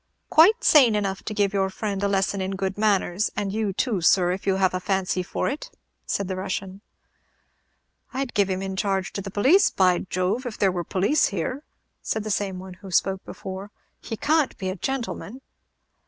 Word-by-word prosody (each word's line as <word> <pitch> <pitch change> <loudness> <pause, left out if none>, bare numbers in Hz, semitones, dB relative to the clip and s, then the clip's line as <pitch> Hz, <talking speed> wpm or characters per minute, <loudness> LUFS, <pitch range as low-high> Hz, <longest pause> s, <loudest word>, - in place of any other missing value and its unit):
"Quite 375 +9 +6
sane 255 -8 +6
enough 195 -2 -1
to 215 - -3
give 205 -1 +1
your 195 -1 +1
friend 200 0 -3
a 200 - +2
lesson 195 0 0
in 190 +1 -2
good 190 0 -2
manners; 205 -2 +1
and 200 -1 -2
you 215 -2 0
too, 200 0 -1
sir, 175 +1 +4
if 190 +2 -5
you 190 - +3
have 190 -1 +2
any 185 - -1
fancy 190 -1 0
for 180 - -2
it," 300 - -4 0.4
said 200 - -1
the 185 - -3
Russian. 190 +1 -4 1.3
"I'd 265 -1 -3
give 200 -2 +2
him 190 0 -2
in 190 0 -4
charge 195 -2 -1
to 200 - -3
the 195 - -6
police, 265 - +4
by 180 -2 +3
Jove! 185 +7 -2
if 225 - -6
there 195 -2 +3
were 175 -1 -3
police 200 - +2
here," 205 - -3 0.4
said 220 - -2
the 215 - -3
same 195 -1 -1
one 185 0 -9
who 195 - -9
spoke 190 +1 +1
before; 195 0 -7 0.3
"he 225 - -5
can't 305 +2 +1
be 190 - -3
a 185 - -3
gentleman." 250 +1 -4
195 Hz, 200 wpm, -24 LUFS, 190-215 Hz, 1.3 s, Quite